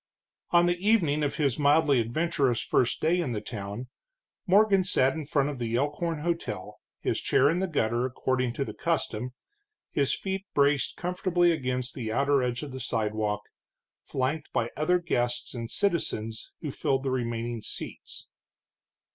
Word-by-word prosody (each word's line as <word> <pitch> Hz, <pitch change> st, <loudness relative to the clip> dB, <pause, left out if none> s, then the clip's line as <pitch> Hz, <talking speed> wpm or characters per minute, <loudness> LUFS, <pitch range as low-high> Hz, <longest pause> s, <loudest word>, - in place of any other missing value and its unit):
On 175 Hz, 0 st, +5 dB
the 175 Hz, 0 st, +1 dB
evening 180 Hz, -8 st, +3 dB
of 145 Hz, -1 st, 0 dB
his 140 Hz, -5 st, 0 dB
mildly 145 Hz, -1 st, +4 dB
adventurous 130 Hz, 0 st, +1 dB
first 120 Hz, -, +1 dB
day 175 Hz, +3 st, +3 dB
in 135 Hz, -8 st, -2 dB
the 105 Hz, -, -1 dB
town, 105 Hz, +3 st, -6 dB, 0.6 s
Morgan 195 Hz, 0 st, +5 dB
sat 135 Hz, -7 st, +3 dB
in 155 Hz, -3 st, -5 dB
front 145 Hz, -1 st, +1 dB
of 140 Hz, -3 st, -5 dB
the 115 Hz, -1 st, -1 dB
Elkhorn 150 Hz, +4 st, -1 dB
hotel, 125 Hz, -, -3 dB, 0.2 s
his -, -, 0 dB
chair 140 Hz, +3 st, +4 dB
in 170 Hz, -, 0 dB
the 190 Hz, -, 0 dB
gutter, 120 Hz, -7 st, 0 dB
according 130 Hz, -1 st, -1 dB
to 140 Hz, -, -2 dB
the -, -, -6 dB
custom, 125 Hz, -7 st, -2 dB, 0.6 s
his 140 Hz, -2 st, +1 dB
feet 195 Hz, 0 st, -4 dB
braced 140 Hz, -1 st, +2 dB
comfortably 180 Hz, -1 st, +2 dB
against 130 Hz, -5 st, -2 dB
the 115 Hz, -4 st, -4 dB
outer 140 Hz, +3 st, +3 dB
edge 125 Hz, +2 st, -1 dB
of 145 Hz, -, -6 dB
the 130 Hz, -, -6 dB
sidewalk, 110 Hz, -3 st, -1 dB, 0.6 s
flanked 140 Hz, +4 st, -2 dB
by 115 Hz, 0 st, 0 dB
other 180 Hz, +4 st, +3 dB
guests 120 Hz, -8 st, -1 dB
and 115 Hz, -2 st, -5 dB
citizens 115 Hz, -, -1 dB
who 150 Hz, -, -3 dB
filled 135 Hz, 0 st, 0 dB
the 135 Hz, -, -1 dB
remaining 120 Hz, -2 st, -2 dB
seats. -, -, -7 dB
140 Hz, 160 wpm, -28 LUFS, 120-165 Hz, 0.6 s, On